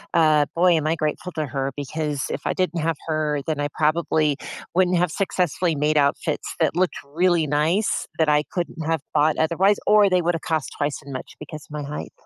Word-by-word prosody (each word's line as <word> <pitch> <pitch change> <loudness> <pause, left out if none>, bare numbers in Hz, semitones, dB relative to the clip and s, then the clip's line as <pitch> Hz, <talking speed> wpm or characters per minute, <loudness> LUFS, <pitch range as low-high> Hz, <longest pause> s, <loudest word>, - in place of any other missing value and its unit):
uh, 155 -3 +5
boy, 180 +2 +4
am 155 -1 0
I 160 - +2
grateful 155 +3 -3
to 155 - -2
her 135 0 -3
because 145 0 -3
if 140 - -3
I - - +1
didn't 175 -3 -1
have 165 +1 0
her, 155 -2 0
then 155 -2 -2
I 145 - 0
probably 155 -2 +2 0.4
wouldn't 180 0 +3
have 175 -1 +1
successfully 180 -3 0
made 150 +2 +1
outfits 140 -1 0
that - - +1
looked 180 0 +1 0.2
really 175 -1 +3
nice 155 +8 +1
that 160 - +2
I 150 0 +4
couldn't 170 -3 -3
have 165 -2 0
bought 150 0 +3
otherwise, 185 +6 +3
or 210 -1 +5
they 180 -1 +2
woulda 170 0 0
cost 160 -3 -2
twice 145 0 -1
as 140 - -9
much 130 - -7
because 150 0 -9
my 150 0 -5
height. 145 +1 -6
155 Hz, 200 wpm, -23 LUFS, 150-175 Hz, 0.4 s, uh